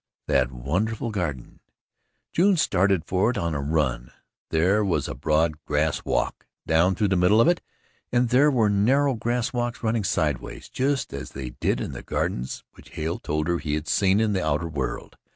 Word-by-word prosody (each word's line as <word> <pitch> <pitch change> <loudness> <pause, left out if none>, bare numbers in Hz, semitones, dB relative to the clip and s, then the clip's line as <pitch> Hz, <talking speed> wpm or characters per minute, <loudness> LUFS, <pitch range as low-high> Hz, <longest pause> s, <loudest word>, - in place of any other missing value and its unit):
That 65 -2 +2
wonderful 100 - -2
garden! 80 - -4 0.7
June 190 +2 +4
started 95 - +2
for 95 +4 +1
it 125 - -2
on 85 -4 -1
a 70 - -2
run. 70 -5 -1 0.4
There 95 +7 +2
was 95 -4 0
a - - -4
broad 75 +2 0
grass 75 +1 0
walk - - -2 0.2
down 85 +4 +3
through 105 +1 +1
the 95 - +2
middle 90 +5 +4
of 115 - +5
it 175 0 +2 0.5
and 120 0 +2
there 135 +5 +5
were 120 -6 +3
narrow 130 +8 +3
grass 120 +2 -1
walks 120 0 -2
running 110 -1 +1
sidewise, 80 -8 -2
just 135 +1 -1
as 70 -2 -7
they 65 -2 -6
did - - -1
in - - -4
the 65 -3 -7
gardens 60 +2 -3
which - - -17
Hale 80 +3 -2
told 75 +1 -2
her 85 -1 +1
he 75 -1 -2
had 75 +1 -4
seen 100 0 +3
in 110 -2 +1
the 95 - 0
outer 80 +2 0
world. 75 -5 -4
90 Hz, 190 wpm, -25 LUFS, 75-115 Hz, 0.7 s, of